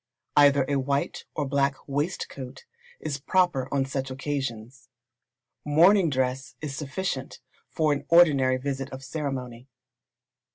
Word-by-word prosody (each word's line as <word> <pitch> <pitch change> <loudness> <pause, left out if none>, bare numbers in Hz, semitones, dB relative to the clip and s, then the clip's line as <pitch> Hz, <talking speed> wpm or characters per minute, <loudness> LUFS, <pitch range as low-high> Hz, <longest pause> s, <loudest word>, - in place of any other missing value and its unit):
Either 140 -2 +5
a 140 - +1
white 140 +1 -2
or 145 -3 -1
black 140 0 +1
waistcoat 140 -3 -4 0.3
is 145 -3 -4
proper 150 -4 +1
on 135 -1 +1
such 135 0 -3
occasions. 130 -3 -5 0.7
Morning 170 +5 +5
dress 130 0 -2
is 145 -3 -5
sufficient 140 -1 -4 0.3
for 155 -2 +1
an 145 - -4
ordinary 140 -7 +5
visit 135 0 -4
of 130 0 -8
ceremony. 130 -4 -5
140 Hz, 120 wpm, -26 LUFS, 130-150 Hz, 0.7 s, Either